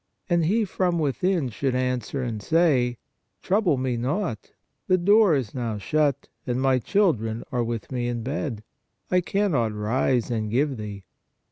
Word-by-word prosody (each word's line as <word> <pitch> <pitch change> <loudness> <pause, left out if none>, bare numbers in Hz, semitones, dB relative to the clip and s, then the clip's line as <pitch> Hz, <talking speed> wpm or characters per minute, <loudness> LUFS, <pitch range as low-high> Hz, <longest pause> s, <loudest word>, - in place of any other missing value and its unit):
And 170 -2 +3
he 215 +6 +2
from 180 -2 0
within 160 0 0
should 130 +3 -2
answer 125 +1 -1
and 115 -4 -4
say: 130 -5 +2 0.5
Trouble 185 -6 +2
me 130 -2 -1
not, 135 - -2 0.4
the 185 - +4
door 200 -1 +5
is 125 -7 -2
now 115 -4 -3
shut, 140 +6 0 0.2
and 125 0 0
my 130 -1 +3
children 115 - +1
are 125 -2 0
with 115 -1 -4
me 125 -2 -1
in 120 -1 -3
bed; 130 -4 -3 0.5
I 180 0 +4
can 200 +2 0
not 115 -7 +1
rise 120 +3 0
and 110 -2 -1
give 135 +4 +1
thee. 105 -2 -7
130 Hz, 160 wpm, -25 LUFS, 120-170 Hz, 0.5 s, door